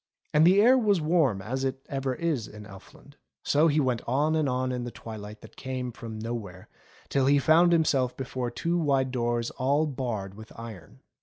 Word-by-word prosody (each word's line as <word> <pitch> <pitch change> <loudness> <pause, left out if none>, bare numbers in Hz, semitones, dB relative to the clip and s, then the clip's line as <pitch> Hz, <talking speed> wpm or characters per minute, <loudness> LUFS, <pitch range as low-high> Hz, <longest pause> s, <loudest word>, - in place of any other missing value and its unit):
And 155 +2 +6
the 190 +3 +6
air 250 +5 +6
was 205 -5 +2
warm 150 - +1
as 130 +5 -3
it 135 0 -3
ever 135 -2 -2
is 155 -9 -1
in 105 0 -11
Elfland. 105 +8 -15 0.3
So 150 +3 +3
he 155 -1 +2
went 125 -5 0
on 145 +6 +1
and 155 -3 +1
on 130 0 -1
in 125 -1 -3
the 120 - -4
twilight 110 -2 -9
that - - -14
came 130 -1 -4
from 115 -1 -8
nowhere, 110 -5 -6 0.4
till 135 -1 +1
he 145 +1 +5
found 165 +4 +5
himself 140 -7 +2
before 130 -1 -3
two 170 +8 -1
wide 135 -4 +1
doors 120 -1 -1
all 140 +4 +1
barred 120 -9 -4
with 110 +2 -12
iron. 110 -8 -10
130 Hz, 190 wpm, -27 LUFS, 115-150 Hz, 0.4 s, And